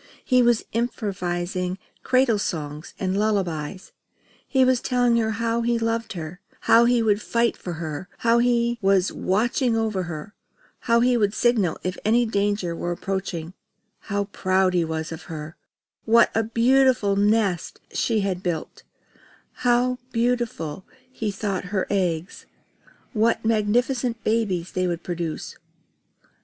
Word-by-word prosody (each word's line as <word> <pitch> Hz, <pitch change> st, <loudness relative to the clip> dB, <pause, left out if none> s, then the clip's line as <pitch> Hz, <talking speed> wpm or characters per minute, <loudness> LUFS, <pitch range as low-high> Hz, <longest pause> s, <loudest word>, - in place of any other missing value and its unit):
He 255 Hz, -1 st, +4 dB
was 240 Hz, -2 st, +3 dB
improvising 185 Hz, -5 st, -2 dB, 0.2 s
cradle 255 Hz, -4 st, +3 dB
songs 150 Hz, -4 st, -4 dB
and 190 Hz, 0 st, -1 dB
lullabies. 185 Hz, -5 st, -1 dB, 0.6 s
He 265 Hz, -2 st, +3 dB
was 255 Hz, -1 st, +2 dB
telling 245 Hz, -2 st, +2 dB
her 220 Hz, -1 st, +1 dB
how 230 Hz, +2 st, -1 dB
he 235 Hz, 0 st, +1 dB
loved 230 Hz, 0 st, -1 dB
her, 170 Hz, +1 st, -7 dB, 0.2 s
how 230 Hz, +1 st, +5 dB
he 240 Hz, -1 st, +3 dB
would 210 Hz, -1 st, +2 dB
fight 235 Hz, +1 st, +1 dB
for 175 Hz, -, -6 dB
her, 160 Hz, +2 st, -5 dB
how 235 Hz, -1 st, +3 dB
he 235 Hz, -1 st, +2 dB
was 195 Hz, -1 st, +3 dB
watching 230 Hz, +4 st, +1 dB
over 220 Hz, -4 st, 0 dB
her, 155 Hz, +4 st, -7 dB, 0.5 s
how 235 Hz, 0 st, +2 dB
he 245 Hz, 0 st, +3 dB
would 205 Hz, -2 st, +1 dB
signal 215 Hz, -9 st, +2 dB
if 185 Hz, +1 st, -3 dB
any 235 Hz, +3 st, +3 dB
danger 200 Hz, -5 st, 0 dB
were 175 Hz, -, -3 dB
approaching, 180 Hz, -2 st, -4 dB, 0.5 s
how 200 Hz, -1 st, -2 dB
proud 185 Hz, -1 st, +1 dB
he 175 Hz, -2 st, +2 dB
was 160 Hz, 0 st, -3 dB
of 160 Hz, -, -8 dB
her, 155 Hz, 0 st, -7 dB, 0.5 s
what 230 Hz, +1 st, +5 dB
a 225 Hz, -, +2 dB
perfect 235 Hz, -3 st, +3 dB
nest 205 Hz, -4 st, +1 dB
she 225 Hz, -3 st, +1 dB
had 190 Hz, -2 st, -2 dB
built, 175 Hz, -4 st, -4 dB, 0.8 s
how 245 Hz, +1 st, +3 dB
beautiful 230 Hz, -9 st, -1 dB, 0.3 s
he 225 Hz, -4 st, -3 dB
thought 195 Hz, -2 st, -3 dB
her 190 Hz, +1 st, -1 dB
eggs, 180 Hz, -3 st, -2 dB, 0.7 s
what 225 Hz, 0 st, +1 dB
magnificent 230 Hz, +2 st, +1 dB
babies 200 Hz, -6 st, 0 dB
they 185 Hz, 0 st, 0 dB
would 170 Hz, -1 st, -3 dB
produce. 170 Hz, -3 st, -4 dB
205 Hz, 140 wpm, -24 LUFS, 180-235 Hz, 0.8 s, how